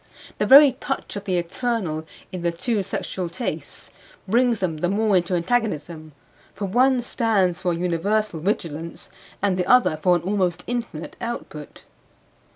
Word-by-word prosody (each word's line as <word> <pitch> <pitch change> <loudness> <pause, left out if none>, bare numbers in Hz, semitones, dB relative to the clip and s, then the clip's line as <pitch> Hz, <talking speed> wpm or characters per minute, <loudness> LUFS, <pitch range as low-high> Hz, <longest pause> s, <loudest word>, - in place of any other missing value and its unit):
The - - +1
very 280 +1 +9
touch 270 -1 -5
of 200 0 -6
the 185 -3 0
eternal 175 -3 -2 0.2
in 185 - -5
the 170 0 0
two 210 +5 -1
sexual 185 -1 -4
tastes 240 +8 -5 0.4
brings 240 +3 +3
them 180 -5 -2
the 175 +3 0
more 210 +1 +2
into 180 +1 0
antagonism; 170 -6 -2 0.4
for 205 - -3
one 250 +5 +3
stands 205 -8 +1
for 180 - 0
a - - -3
universal 180 +2 0
vigilance 165 -3 -4 0.3
and 195 -2 +2
the 180 - 0
other 250 -11 +4
for 180 0 +4
an 170 - -2
almost 185 -2 0
infinite 235 -10 -5
output. 230 -11 -7
185 Hz, 155 wpm, -23 LUFS, 170-230 Hz, 0.4 s, very